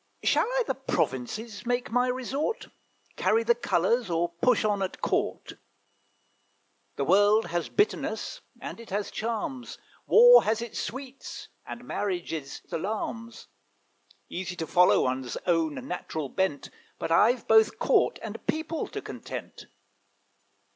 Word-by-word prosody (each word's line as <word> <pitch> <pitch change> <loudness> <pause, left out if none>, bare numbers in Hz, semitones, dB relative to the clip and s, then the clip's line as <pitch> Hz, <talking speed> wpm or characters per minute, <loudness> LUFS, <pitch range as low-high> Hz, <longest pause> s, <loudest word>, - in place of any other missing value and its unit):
Shall - - +3
I - - +1
the 265 - 0
provinces 215 - -3
make 245 +1 -1
my 245 +2 +2
resort, 270 - -2 0.5
Carry 455 - +2
the 475 - +4
colours, 240 - +1
or 170 0 +1
push 215 +8 +2
on 205 -2 +1
at 190 - -3
court? - - -2 1.4
The 140 - -1
world 205 +5 +5
has 170 0 -2
bitterness, 415 +1 -1 0.2
and - - -7
it 230 - -11
has 205 +1 -2
charms, 240 +3 -4 0.3
War 485 +2 +8
has 220 +1 +1
its 235 -1 -5
sweets, 265 +1 -7 0.2
and 240 - -7
marriage 185 -8 -3
its 145 -4 -6
alarms: 220 +5 -4 0.8
Easy 180 0 -5
to 165 - -3
follow 180 +2 +4
one's 130 -1 -2
own 165 -4 +1
natural 160 -5 -4
bent, 190 -5 -1 0.3
But - - -4
I've 230 +8 +4
both 220 -1 +5
court - - +2
and - - -7
people 315 +1 -2
to - - -6
content." - - -8
220 Hz, 135 wpm, -27 LUFS, 175-250 Hz, 1.4 s, War